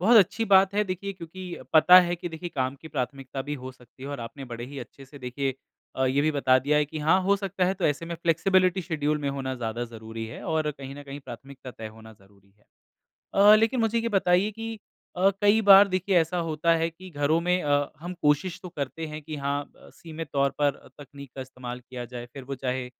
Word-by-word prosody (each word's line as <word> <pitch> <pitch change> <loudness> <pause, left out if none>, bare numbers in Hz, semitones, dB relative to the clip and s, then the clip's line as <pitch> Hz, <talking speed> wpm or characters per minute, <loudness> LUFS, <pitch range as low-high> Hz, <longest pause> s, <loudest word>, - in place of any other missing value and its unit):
बहुत 225 +6 +6
अच्छी 220 +3 +4
बात 195 -1 +5
है 210 +1 +2
देखिए 190 +1 -4
क्योंकि 185 0 -10 0.3
पता 180 +3 +9
है 175 0 -1
कि 175 +1 -5
देखिए 165 +1 -6
काम 130 0 -1
की 160 - -9
प्राथमिकता 135 0 -4
भी 145 +1 -4
हो 130 - -6
सकती 125 0 -19
है 135 - -6
और 145 -2 -5
आपने 120 +4 -8
बड़े 120 +1 -5
ही 140 +2 -8
अच्छे 135 +2 -10
से 140 +2 -14
देखिए 130 +1 -3 0.4
अ, 130 - +1
ये 135 +2 +2
भी 155 - +2
बता 130 -3 +3
दिया 145 +3 +1
है 150 - +3
कि 150 +2 -7
हाँ, 160 +5 +3
हो 200 +2 +3
सकता 195 -2 -1
है 185 +2 +1
तो - - -4
ऐसे 145 +2 -1
में 170 - -4
फ्लेक्सिबिलिटी 185 +3 +2
शेड्यूल 150 -3 -1
में 145 -1 -2
होना 135 -1 -3
ज़्यादा 120 -1 -3
ज़रूरी 115 -1 -8
है 110 - -9
और 155 -1 0
कहीं 135 -1 -9
न 145 - -9
कहीं 140 0 -8
प्राथमिकता 135 +1 -10
तय 110 -2 -8
होना 110 0 -14
ज़रूरी 100 -1 -24
है। 105 - -31 0.7
अ, 205 +2 +8
लेकिन 225 +3 +2
मुझे 225 +1 +1
ये 230 - -1
बताइए 195 -1 +2
कि 225 +1 -6 0.4
अ, 190 +2 +4
कई 205 +2 +5
बार 200 0 +8
देखिए 185 0 0
ऐसा 165 +2 -1
होता 160 +2 +2
है 165 0 0
कि 185 +3 -13
घरों 145 +1 +1
में 180 +1 +1
अ, 145 -1 +1
हम 175 +2 -6
कोशिश 150 +5 +1
तो 180 - -7
करते 160 0 -5
हैं 155 0 -7
कि 155 +1 -6
हाँ, 140 0 -1
अ, - - -19
सीमित 165 -1 -8
तौर 140 0 +2
पर 145 -1 +2 0.2
तकनीक 140 -1 -11
का 135 - -6
इस्तेमाल 125 -1 -7
किया 125 0 -8
जाए 120 0 -6
फिर 135 - -9
वो 135 +2 -5
चाहे 130 -1 -3
150 Hz, 235 wpm, -26 LUFS, 130-180 Hz, 0.7 s, पता